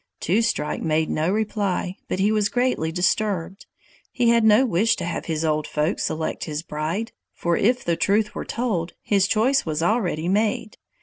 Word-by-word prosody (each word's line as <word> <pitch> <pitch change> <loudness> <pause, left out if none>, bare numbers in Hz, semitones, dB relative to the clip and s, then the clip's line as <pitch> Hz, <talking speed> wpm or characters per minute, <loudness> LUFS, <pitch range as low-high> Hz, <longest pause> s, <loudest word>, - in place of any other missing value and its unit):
Two 195 +8 +1
Strike 225 -9 -1
made 160 0 0
no 155 +3 0
reply, 205 -3 -1
but - - -2
he 200 +3 +2
was 210 -1 +1
greatly 245 -10 0
disturbed. 185 +1 -1 0.4
He 240 -2 +2
had 235 -1 +4
no 220 +4 +5
wish 220 +1 +2
to - - -5
have 170 - -4
the 160 -1 -1
old 155 0 0
folks 155 +5 -1
select 160 0 -3
his 155 0 -4
bride, 165 +8 -3 0.2
for 170 0 0
if 245 +7 +1
the 170 - +1
truth 210 +4 +1
were - - -4
told, 210 -9 -2
his 195 -2 +2
choice 255 +7 +2
was 155 0 -2
already 175 -6 0
made. 210 +2 0
195 Hz, 180 wpm, -23 LUFS, 165-220 Hz, 0.4 s, no